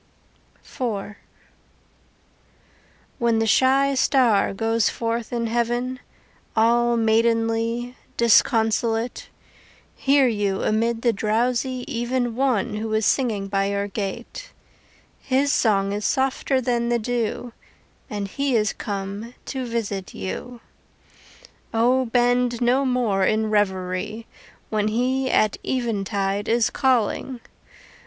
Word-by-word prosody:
IV 210 -5 -4 2.0
When 235 -1 +2
the 225 - +1
shy 270 +5 +3
star 255 -6 +3
goes 225 +2 +1
forth 230 0 -3
in 235 -1 -1
heaven 240 +2 -1 0.6
All 235 +1 +3
maidenly, 230 +2 +1 0.2
disconsolate, 225 0 +2 0.7
Hear 275 -1 +3
you 205 -4 -1
amid 230 +1 0
the 235 -2 +3
drowsy 245 +4 0
even 240 0 -1
One 240 -4 0
who 220 +1 -4
is 220 -1 +1
singing 215 -7 +1
by 195 0 0
your 200 0 -1
gate. 215 - -6 0.7
His 275 +2 +1
song 200 -3 +2
is 205 +1 -3
softer 265 +1 +1
than 240 -2 0
the 240 - +2
dew 235 +1 -3 0.6
And 205 -1 -3
he 275 +5 -1
is 215 -2 +1
come 200 +3 -5
to 260 -2 -4
visit 210 -5 -4
you. 225 - -6 1.1
O 250 +3 +3
bend 245 0 +2
no 250 +3 +2
more 235 -7 +1
in 215 +2 +1
revery 190 +1 -1 0.5
When 210 -1 +1
he 255 +4 0
at 215 -4 +2
eventide 205 -5 -1
is 230 0 +2
calling. 255 -1 0
230 Hz, 110 wpm, -23 LUFS, 210-245 Hz, 2.0 s, shy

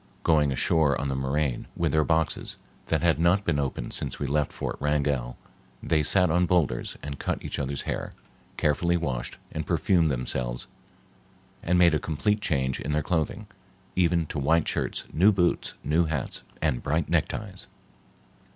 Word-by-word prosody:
Going 75 -3 +3
ashore 70 +1 +2
on 70 - -2
the 65 - -1
moraine 65 0 -1
with - - 0
their 80 0 +3
boxes 80 0 -1 0.3
that - - 0
had 85 -2 +3
not 90 +4 +3
been 75 -4 +1
opened 65 -3 -3
since - - -1
we - - -3
left 75 0 0
Fort - - -4
Wrangell, 70 -4 0 0.5
they 80 -2 +2
sat 90 +3 +3
on 90 +1 +3
boulders 85 -6 0
and 70 -1 -6
cut - - -3
each - - -3
other's 70 0 -3
hair, - - -3 0.5
carefully 85 +4 +2
washed 65 -7 -3
and 80 - -3
perfumed 85 +1 +2
themselves 60 -2 -2 1.0
and 90 +1 +1
made 85 -2 +6
a 75 - +2
complete 105 +7 0
change 65 -9 0
in 75 - -3
their 75 0 +1
clothing, 90 +6 -1 0.5
even 85 -2 +2
to 75 - -4
white 80 +4 +2
shirts, - - -1
new 95 +6 +5
boots, 90 -3 0
new 80 +3 +2
hats, 75 -5 -3 0.2
and 70 -6 +1
bright 80 +3 0
neckties. 90 +4 -2
75 Hz, 165 wpm, -26 LUFS, 70-85 Hz, 1.0 s, made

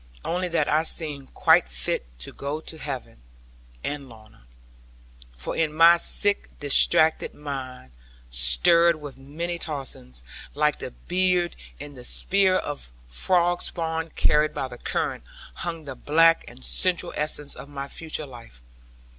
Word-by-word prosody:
Only 180 +2 -1
that 165 -4 0
I 155 +1 +3
seemed 150 -4 -1
quite - - +4
fit - - -1 0.2
to - - -5
go 140 +2 -4
to 160 0 -8
heaven, 130 - -6 0.6
and 145 -2 -4
Lorna. 110 - -17 0.9
For 60 - -4
in 160 -2 +1
my 165 +2 +7
sick 200 +4 +1
distracted 155 +2 +3
mind 130 - -7 0.4
(stirred 65 - +5
with 145 -3 -10
many 170 +6 -5
tossings), 130 - -5 0.3
like 150 0 +1
the - - -5
bead 180 +3 0 0.2
in 145 0 -8
the 125 -2 -11
spread 190 +7 +2
of 145 - -6
frog 175 - +1
spawn 160 -1 -2
carried 150 +1 +2
by 135 - -2
the 125 -1 -11
current, - - -2 0.3
hung 165 -3 -5
the 135 - -6
black 165 +5 +4
and 65 - -9
central 170 - +2
essence 150 -1 -1
of 140 - -10
my 140 -1 -6
future 155 +1 -5
life. 115 - -13
150 Hz, 140 wpm, -25 LUFS, 130-165 Hz, 0.9 s, my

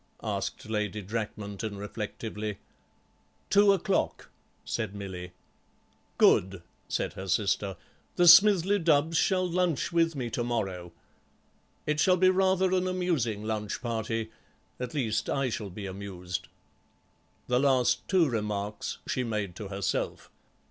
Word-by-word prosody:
asked - - -3
Lady 105 -1 -2
Drakmanton 105 0 -4
reflectively. 105 0 -5 0.9
"Two 205 0 +6
o'clock," 195 0 0 0.3
said 110 -3 -3
Milly. 95 -3 -6 0.9
"Good," 95 -1 +4 0.2
said - - -2
her 95 - -7
sister; 100 0 0 0.4
"the 175 - +3
Smithly 195 +2 +7
Dubbs 160 0 +3
shall 185 +2 +2
lunch 175 -3 0
with 165 -1 +2
me 125 -4 -3
to 120 - -1
morrow. 95 -7 -3 0.9
It 150 0 0
shall 185 +2 +4
be 185 +1 +5
rather 190 0 +2
an 185 0 +1
amusing 165 - -1
lunch 110 -1 -3
party. 115 -1 -3 0.5
At 125 +2 -5
least, 110 -6 -1
I 135 -3 0
shall 105 -2 -4
be 100 +2 -7
amused." 95 -2 -5 1.0
The 125 0 +2
last 130 -3 +2
two 185 -4 +4
remarks 105 -3 -3
she 130 - -1
made 105 -6 -3
to 105 - -6
herself. 95 -2 -3
115 Hz, 125 wpm, -28 LUFS, 100-165 Hz, 1.0 s, Smithly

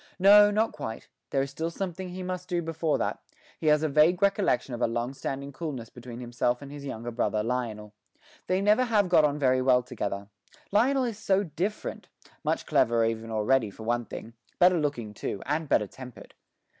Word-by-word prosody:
No, 205 +2 +8
not 215 +2 +1
quite; 115 -7 -7 0.2
there 135 -1 +1
is 135 - -6
still 160 +4 -3
something 185 +1 -5
he 185 +1 -6
must 180 0 -4
do 175 -1 0
before 160 -1 0
that: - - -2 0.4
he 160 - -2
has 150 0 +4
a - - +2
vague 155 +5 +4
recollection 195 - +1
of 120 - -5
a - - +3
long 120 +3 -2
standing 140 +1 -5
coolness 135 -8 -5
between 120 0 -9
himself 120 0 -1
and 140 -1 -10
his 145 -1 -8
younger 120 -1 -5
brother, 110 -2 0
Lionel. 110 -3 -3 0.5
They 185 +1 +1
never 210 +5 +4
have 210 -5 +2
got 160 -3 +6
on 145 0 0
very 130 -3 +2
well 125 -1 +4
together; 100 -5 -4 0.4
Lionel 255 +6 +3
is 230 -4 -3
so 200 -2 +2
different 185 +5 -4 0.3
much - - -1
cleverer 115 0 +3
even 115 0 -2
already, 110 +2 +2
for 105 +3 -11
one 120 +1 0
thing; 115 - -8 0.2
better 180 -1 +5
looking 125 -8 -2
too, 100 - -4
and 150 +2 -2
better 105 - +3
tempered. 125 +3 -12
140 Hz, 195 wpm, -28 LUFS, 120-180 Hz, 0.5 s, No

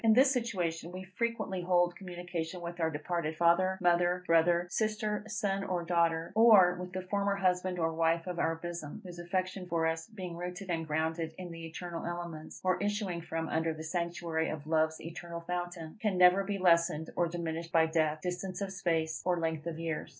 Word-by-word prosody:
In 225 -1 +6
this 260 +4 +6
situation, 175 -10 -1
we 185 +1 -6
frequently 190 -1 -2
hold 175 0 +3
communication 175 -2 -5
with 170 0 -6
our 160 -1 +2
departed 160 +1 -2
father, 185 +3 +4
mother, 175 0 +3
brother, 170 +1 +4
sister, 215 +1 -1
son 200 -2 -1
or 180 -3 -1
daughter; 165 -1 +1
or 210 -5 +7
with 180 0 -6
the 185 0 -3
former 200 +1 0
husband 185 -1 +1
or 165 -1 0
wife 165 +1 +2
of 180 -2 -4
our 165 -1 +1
bosom, 170 -2 -6
whose 175 -1 -8
affection 185 +1 -2
for 165 -1 +1
us, 160 0 -1
being 185 -6 -7
rooted 180 +2 -5
and 165 -1 -1
grounded 160 +1 -1
in 180 -2 -7
the 165 0 -7
eternal 170 +1 -5
elements, 170 -2 -6
or 185 -1 +1
issuing 205 -4 -1
from 165 0 -3
under 160 0 0
the 155 - -7
sanctuary 170 -1 -1
of 150 -2 -5
Love's 160 0 +1
eternal 170 +1 -7
fountain, 175 0 -5
can 210 -4 +1
never 180 +2 +6
be 200 0 -2
lessened 170 -3 +3
or 175 - +2
diminished 165 -1 -4
by 165 -2 +5
death, 155 -1 +1
distance 180 +1 -3
of 195 -1 -3
space, 165 -4 0
or 180 -1 +1
length 160 -1 -2
of 165 -1 -4
years. 165 -1 -3
175 Hz, 190 wpm, -32 LUFS, 165-185 Hz, -, or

